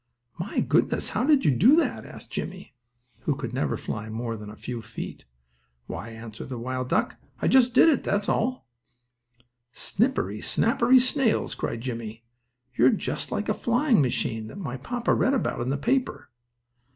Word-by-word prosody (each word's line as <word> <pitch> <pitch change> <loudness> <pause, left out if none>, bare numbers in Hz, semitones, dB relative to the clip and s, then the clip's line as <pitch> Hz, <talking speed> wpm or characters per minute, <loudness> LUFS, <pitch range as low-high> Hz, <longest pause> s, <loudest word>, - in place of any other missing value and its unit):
"My 180 +6 -1
goodness! - - +1
How - - 0
do 305 - +7
you 270 - +2
do 245 - +6
that?" 335 - 0
asked - - -12
Jimmie, 185 -5 -6 0.5
who 145 -3 0 0.2
never 130 - 0
could - - -10
fly 110 0 -4
more 115 +1 -3
than 105 -1 -8
a 105 - -10
few 120 0 -6
feet. 110 0 -8 0.6
"Why," 105 - -6
answered 115 +1 -9
the 130 - -4
wild 130 +1 -3
duck, - - 0 0.2
"I - - 0
just 250 -2 +4
did - - +7
it, 315 - +3
that's 200 0 0
all." 250 - 0 1.0
"Snippery, 245 - -1
snappery 250 +2 +4
snails!" 255 -2 +1
cried 115 - -4
Jimmie, 115 -2 -6 0.5
"you're 125 +2 +5
just - - -2
like 210 - -2
a 215 - +2
flying 240 - +2
machine 115 -4 -1
that 195 - -10
my 145 -10 -4
papa 240 - -1
read 275 - +2
about 250 - -1
in 120 - -2
the 140 - 0
paper." 255 - -1
140 Hz, 170 wpm, -26 LUFS, -, 1.0 s, do